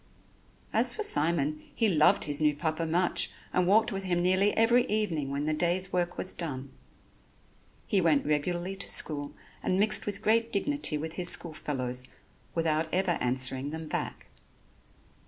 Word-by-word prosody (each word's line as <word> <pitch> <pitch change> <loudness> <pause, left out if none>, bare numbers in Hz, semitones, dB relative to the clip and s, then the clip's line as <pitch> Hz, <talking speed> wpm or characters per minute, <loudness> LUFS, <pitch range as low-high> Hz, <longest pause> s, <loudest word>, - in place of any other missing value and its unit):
As - - +3
for 435 - -3
Simon, 155 - +2
he 225 - +1
loved 155 -6 +3
his 145 0 +1
new 150 -1 +2
Papa 160 +1 -3
much, 175 +2 +2 0.2
and 180 -1 +1
walked 215 +4 +3
with 195 -1 -5
him 180 -2 -1
nearly 185 +3 +2
every 235 +2 +4
evening 175 -10 -1
when 140 +1 -3
the 155 - 0
day's 175 +4 0
work 175 -1 -2
was 185 - -2
done. 140 -5 -6 1.1
He 195 - +1
went 160 -4 +2
regularly 175 +5 -2
to - - -5
school 145 -2 +3 0.3
and 185 - -1
mixed 215 +1 +2
with 205 0 -3
great 230 +1 +1
dignity 285 - +1
with 160 +2 -6
his 180 -1 +4
school 170 -2 0
fellows 130 -4 -3 0.5
without 160 -1 -1
ever 180 -2 0
answering 130 +2 +1
them 160 +1 -7
back. - - -5
170 Hz, 160 wpm, -28 LUFS, 150-190 Hz, 1.1 s, every